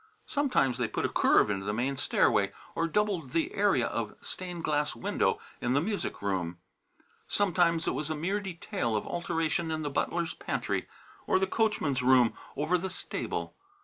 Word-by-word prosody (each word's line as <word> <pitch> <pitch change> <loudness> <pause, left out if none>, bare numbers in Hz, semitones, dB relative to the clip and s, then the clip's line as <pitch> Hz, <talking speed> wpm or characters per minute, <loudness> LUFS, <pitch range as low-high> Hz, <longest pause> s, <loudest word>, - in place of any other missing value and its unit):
Sometimes 195 - +1
they 120 - +1
put - - -2
a - - +1
curve 105 - +4
into 95 -1 -2
the 105 +1 -2
main 130 +4 0
stairway - - +2 0.2
or 165 - 0
doubled 180 -7 0
the 165 -1 +1
area 195 -12 +3
of 115 -3 -3
stained 180 -2 -6
glass 150 -2 0
window 115 - 0 0.2
in 120 - +1
the 140 - +4
music 200 - -3
room; 90 -4 -1 0.7
sometimes 175 -4 +2
it - - +2
was 150 0 -3
a 155 - -1
mere 185 +7 0
detail 180 - -3
of 105 - -1
alteration 165 -1 -1
in 155 -1 -2
the 145 - -2
butler's 170 +4 0
pantry, - - -2 0.4
or - - +4
the 190 - +2
coachman's 190 - +1
room 125 -2 +5 0.2
over 160 +5 +2
the 190 +2 -3
stable. 180 - -3
160 Hz, 175 wpm, -30 LUFS, 125-185 Hz, 0.7 s, room